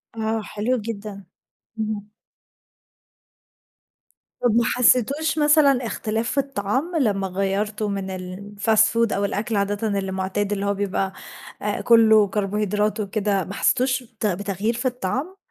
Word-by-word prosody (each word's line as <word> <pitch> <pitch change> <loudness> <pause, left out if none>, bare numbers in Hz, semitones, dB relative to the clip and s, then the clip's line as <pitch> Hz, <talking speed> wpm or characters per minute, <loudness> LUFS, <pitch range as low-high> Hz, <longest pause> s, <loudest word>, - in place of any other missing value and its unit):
آه 220 0 -1
حلو 215 +4 -1
جدًا 210 -3 -6 0.5
اهم. 215 -1 -3 2.3
طب 240 -3 +2
ما 235 - +4
حسيتوش 255 +7 +2
مثلًا 295 -4 +4
اختلاف 225 +1 -2
في - - -5
الطعام 275 - -2
لما 200 -7 +1
غيرتوا 200 +3 -1
من 190 -1 -3
الfast 200 +4 0
food 230 -1 +2
أو 200 - 0
الأكل 215 +3 -2
عادةً 205 +2 0
اللي 195 -1 -4
معتاد، 190 +2 -2
اللي 200 0 -2
هو 200 - +1
بيبقى 195 -1 -2 0.7
كله، 220 -2 +6
كربوهيدرات 210 +1 -1
وكده 200 -1 0
ما 195 - -7
حسيتوش 255 +5 +1
بت 225 -2 -7
بتغيير 200 +3 -1
في 245 +3 -5
الطعام؟ 255 - -2
210 Hz, 130 wpm, -23 LUFS, 200-235 Hz, 2.3 s, كله